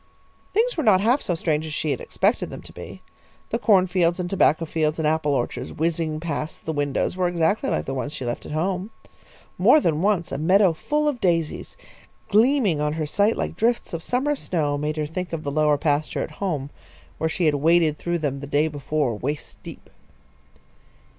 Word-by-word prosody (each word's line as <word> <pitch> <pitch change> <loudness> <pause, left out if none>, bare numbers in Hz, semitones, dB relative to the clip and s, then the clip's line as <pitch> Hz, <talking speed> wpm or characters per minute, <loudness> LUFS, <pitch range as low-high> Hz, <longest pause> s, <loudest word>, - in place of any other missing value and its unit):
Things 470 +4 +1
were 315 - -1
not 210 -6 +5
half 240 +8 +2
so 175 - -1
strange 155 -2 0
as 155 -1 -6
she 155 - -1
had - - -2
expected - - 0
them - - -9
to - - -13
be. - - -10 0.5
The 230 - 0
corn 195 -6 +4
fields 175 -1 +1
and 180 - -2
tobacco 170 -3 +2
fields 155 -1 -1
and 160 -2 0
apple 155 -1 +1
orchards 120 - -3
whizzing 160 -1 -1
past 155 -1 -5
the 160 - -2
windows 145 +2 -1
were 185 -1 +1
exactly 175 +9 +1
like - - -1
the 135 - -3
ones 135 +2 -3
she 150 - -6
had 120 - -2
left 120 - -5
at - - -8
home. 185 +5 -1 0.7
More 310 - +6
than 160 - 0
once 195 -3 +1
a 135 - -3
meadow 185 +3 +4
full 300 - -1
of 275 -5 -1
daisies, 165 -4 -1 0.5
gleaming 215 - +3
on 150 0 0
her 155 -1 -2
sight 205 +8 +1
like - - -3
drifts 235 -2 0
of 165 - -3
summer 260 - 0
snow, 155 - -1
made 150 +2 -2
her 155 - 0
think 175 +3 -5
of 160 -1 -3
the 140 - -3
lower 150 0 +3
pasture 150 0 0
at - - -7
home, 150 -8 -2 0.5
where 160 - 0
she 175 +2 -1
had 155 - +4
waded 155 +1 +3
through 175 0 -1
them 145 -4 -2
the 140 - -7
day 145 +2 +2
before, 145 -4 -1
waist 145 +7 -5
deep. - - -11
160 Hz, 205 wpm, -23 LUFS, 150-185 Hz, 0.7 s, More